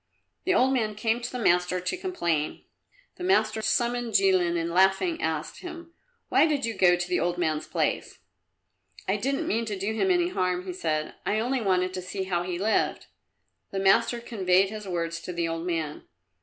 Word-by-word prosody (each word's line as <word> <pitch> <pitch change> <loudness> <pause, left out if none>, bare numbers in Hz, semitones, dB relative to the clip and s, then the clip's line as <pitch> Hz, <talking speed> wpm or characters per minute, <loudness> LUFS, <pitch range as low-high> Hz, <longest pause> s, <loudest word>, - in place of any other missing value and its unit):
The 375 - +3
old 265 -4 +4
man 215 -5 0
came 225 +2 0
to 240 - -4
the 250 - -4
master 180 -4 +2
to 180 - -2
complain. 170 - -2 0.5
The - - -7
master 220 - +2
summoned 240 0 0
Jilin 185 -3 +3
and 165 0 -2
laughing, 195 - +3
asked - - -3
him, 340 -2 -9 0.3
"Why - - +4
did 290 -4 0
you 230 - -2
go 180 -3 +5
to 175 0 -3
the 180 - +1
old 175 +1 0
man's 155 -3 -1
place?" - - -1 0.9
"I 190 - +2
didn't 275 +7 -1
mean 230 +2 0
to 210 -3 -4
do 200 +3 -2
him 380 +12 +1
any 355 -1 +3
harm," 180 - -1
he 185 - -4
said. 155 -3 -2
"I 210 - 0
only 245 +3 0
wanted 185 -2 +1
to 185 - -4
see 185 +2 -4
how 180 -2 -1
he 175 0 -3
lived." 210 +4 0 0.6
The 195 - -5
master 230 +5 +3
conveyed 195 -4 +2
his 210 -2 -7
words 170 -2 -2
to 180 - -6
the 170 -1 -1
old 165 +1 -4
man. 160 -3 -3
195 Hz, 195 wpm, -27 LUFS, 175-235 Hz, 0.9 s, go